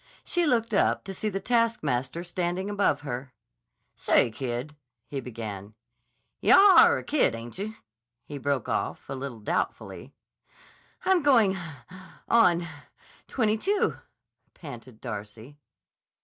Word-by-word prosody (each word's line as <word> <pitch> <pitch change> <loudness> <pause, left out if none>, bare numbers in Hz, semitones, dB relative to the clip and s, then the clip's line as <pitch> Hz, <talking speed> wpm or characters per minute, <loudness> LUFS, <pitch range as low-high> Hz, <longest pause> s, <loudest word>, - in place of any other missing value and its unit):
She 350 -2 0
looked 230 -4 +1
up 200 - +2
to 195 - -6
see 215 +3 -2
the 195 -1 -3
taskmaster 170 - 0
standing 180 +2 -3
above 200 -8 +1
her. 130 -2 -6 0.6
"Say, 115 - +2
kid," 125 +4 -5 0.3
he 140 - -5
began. 110 -4 -7 0.6
"Yah 395 -1 +7
are - - +6
a - - -6
kid, 285 - +2
ainche?" 185 - -6 0.5
he 145 -1 -7
broke 140 -3 -1
off, - - -3
a - - -2
little 130 -4 -6
doubtfully. - - -3 0.9
"I'm 375 -2 +4
going—on—twenty 185 - 0
two," 400 - 0 0.6
panted 125 -6 -11
Darcy. 110 +4 -8
155 Hz, 110 wpm, -27 LUFS, -, 0.9 s, Yah